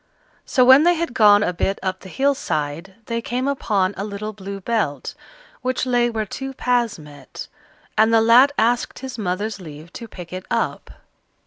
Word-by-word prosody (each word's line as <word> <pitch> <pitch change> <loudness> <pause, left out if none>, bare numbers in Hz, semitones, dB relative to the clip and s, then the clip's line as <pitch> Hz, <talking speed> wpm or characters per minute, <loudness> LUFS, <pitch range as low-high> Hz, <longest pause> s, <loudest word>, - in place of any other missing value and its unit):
So 255 -2 +3
when 260 +3 +8
they 350 +2 +4
had 335 -5 -3
gone 210 -3 +6
a 180 - -1
bit 195 +3 -1
up 185 -1 -2
the 190 - -12
hill 280 +7 +1
side, 155 - -4
they 230 0 -3
came 250 +3 -2
upon 205 -8 0
a 195 - -4
little 210 +1 -5
Blue 200 -1 -7
Belt 195 - -2 0.5
which 255 0 -1
lay 245 -1 +2
where 220 -2 -2
two 270 +6 -6
paths 245 -3 0
met, 145 -3 -11 0.5
and 220 +1 +4
the 225 - +5
lad 240 +5 +6
asked 235 +2 +1
his 260 -3 -7
mother's 200 +2 -3
leave 155 0 -11
to 235 - -8
pick 180 -4 -10
it 185 0 -7
up. - - -2
215 Hz, 185 wpm, -21 LUFS, 185-245 Hz, 0.5 s, when